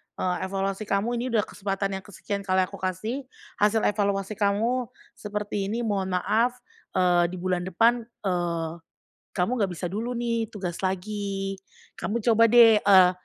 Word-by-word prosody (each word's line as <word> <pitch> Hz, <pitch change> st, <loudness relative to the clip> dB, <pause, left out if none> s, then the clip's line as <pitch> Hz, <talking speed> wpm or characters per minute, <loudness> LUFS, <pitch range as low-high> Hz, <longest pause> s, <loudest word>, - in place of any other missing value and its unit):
"Eee, 180 Hz, -1 st, -1 dB
evaluasi 195 Hz, +2 st, -2 dB
kamu 205 Hz, +5 st, 0 dB
ini 250 Hz, -, -2 dB
udah 225 Hz, -4 st, +2 dB
kesempatan 195 Hz, -1 st, -3 dB
yang -, -, -17 dB
kesekian 200 Hz, 0 st, -5 dB
kali 190 Hz, -1 st, +2 dB
aku -, -, -7 dB
kasih. 215 Hz, +9 st, -3 dB, 0.3 s
Hasil 210 Hz, +1 st, +3 dB
evaluasi 200 Hz, 0 st, 0 dB
kamu 225 Hz, +5 st, +1 dB, 0.3 s
seperti 210 Hz, -2 st, -3 dB
ini 235 Hz, +3 st, -2 dB
mohon 195 Hz, -4 st, -1 dB
maaf, 225 Hz, +7 st, +1 dB, 0.4 s
eee, 180 Hz, -1 st, +4 dB
di -, -, -5 dB
bulan 180 Hz, 0 st, -1 dB
depan, 230 Hz, +6 st, +3 dB, 0.2 s
eee, 170 Hz, -3 st, -1 dB, 0.6 s
kamu 180 Hz, +5 st, 0 dB
nggak 200 Hz, -4 st, 0 dB
bisa 175 Hz, +1 st, -4 dB
dulu 230 Hz, +6 st, -3 dB
nih 235 Hz, -1 st, -1 dB
tugas 180 Hz, -4 st, -4 dB
lagi, 195 Hz, 0 st, -3 dB, 0.4 s
kamu 230 Hz, +2 st, -2 dB
coba 230 Hz, +1 st, +5 dB
deh, 230 Hz, -1 st, +7 dB
eee 185 Hz, -3 st, +7 dB
200 Hz, 155 wpm, -26 LUFS, 185-225 Hz, 0.6 s, deh